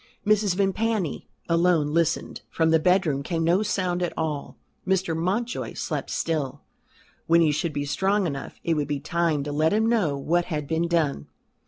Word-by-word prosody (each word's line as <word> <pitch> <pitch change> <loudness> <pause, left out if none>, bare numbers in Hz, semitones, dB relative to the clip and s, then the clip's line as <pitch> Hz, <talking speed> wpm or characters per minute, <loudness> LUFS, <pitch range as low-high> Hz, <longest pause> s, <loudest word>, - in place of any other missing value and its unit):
Mrs. 210 -3 +3
Vimpany, 200 -2 -1 0.2
alone, 170 -3 +2
listened. 165 -1 0
From 160 -1 +1
the 160 - +5
bedroom 180 -5 +2
came 165 +3 -2
no 175 +4 +3
sound 185 -4 -1
at 175 - -2
all. 155 -3 -3 0.3
Mr. 190 -3 0
Mountjoy 200 +9 -2
slept - - -4
still. 145 -4 -2 0.6
When 170 +1 +5
he 155 -2 +4
should 155 +2 -1
be 145 -1 -3
strong 190 +8 +1
enough 140 -5 -5
it 170 - +1
would 150 -2 -1
be 145 -1 -2
time 160 -1 0
to 145 - -4
let 155 +4 +2
him 220 +1 +2
know 195 -12 +1
what 170 +5 +1
had 150 -4 -3
been 165 +2 0
done. 155 - 0
165 Hz, 175 wpm, -25 LUFS, 150-185 Hz, 0.6 s, the